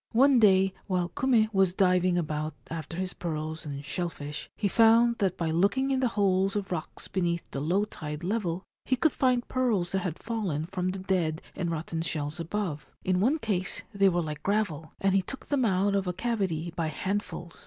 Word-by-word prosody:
One 265 +2 +6
day 190 -3 +5
while 180 -3 0
Kume 235 +1 +3
was 190 -2 +3
diving 180 -2 +3
about 155 -2 -2 0.2
after 165 0 -5
his 185 0 -2
pearls 155 -2 -4
and 140 0 -6
shell 170 +4 -1
fish, 145 -2 -7
he 205 - +1
found 230 +3 +5
that 190 -3 +1
by 165 -2 -1
looking 200 +11 +2
in 265 - +2
the 260 - +2
holes 195 -1 +2
of 200 -2 -2
rocks 165 -3 -4
beneath 170 -2 -1
the 140 - -3
low 185 +7 +2
tide 150 -5 -6
level 185 -2 -1 0.2
he 260 - +1
could 305 +5 +2
find 250 -2 +1
pearls 225 -9 +1
that 190 - +1
had 180 -3 -3
fallen 195 -10 -2
from 185 +1 -2
the 190 - -3
dead 180 -4 -1
and 175 -2 -2
rotten 165 0 -3
shells 155 -1 -3
above; 170 -3 -3 0.2
in 185 -1 +1
one 255 +11 +3
case 200 - -1
they 195 -1 +4
were 175 -1 0
like 150 -1 -5
gravel, 185 -6 -1
and 195 -1 +2
he 195 - +4
took 270 +8 -7
them 275 -4 +2
out 200 0 +2
of 195 -2 0
a 180 - 0
cavity 185 -6 -1
by 165 -2 -1
handfuls. 190 +1 -4
185 Hz, 200 wpm, -28 LUFS, 165-210 Hz, 0.2 s, One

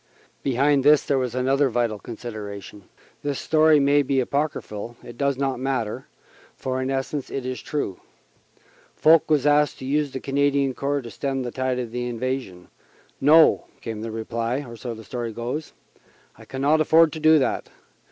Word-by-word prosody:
Behind 140 +1 +2
this 150 0 +6
there 140 -2 +1
was 125 -2 -2
another 135 +2 +2
vital 115 -3 -1
consideration. 105 -3 -8 0.4
This 145 -2 -2
story 155 -1 +4
may 140 +1 +4
be 135 -1 0
apocryphal 120 -5 -3
it 120 - -10
does 140 +1 0
not 135 -2 -1
matter, 130 -5 -2 0.5
for 130 0 -3
in 130 - -2
essence 135 +1 -3
it 135 -2 -4
is 130 0 -4
true. 140 -11 -3 1.0
Foch 160 0 +5
was 150 -3 +2
asked 150 0 +3
to - - -8
use 145 +2 0
the 130 - -5
Canadian 140 0 +1
Corps 140 +1 -2
to 115 - -8
stem 135 -2 -2
the 120 - -4
tide 130 0 -1
of 120 -2 -4
invasion. 120 -6 -4 0.5
"No," 155 +4 +6
came 110 -2 -6
the 115 - -4
reply 115 +4 -3
so 115 0 -6
the 110 - -11
story 120 0 -4
goes 125 +7 -4 0.6
"I 110 - -15
cannot 140 +7 +1
afford 160 0 +5
to 160 - -5
do 155 0 +6
that. 135 - -1
130 Hz, 165 wpm, -24 LUFS, 120-145 Hz, 1.0 s, this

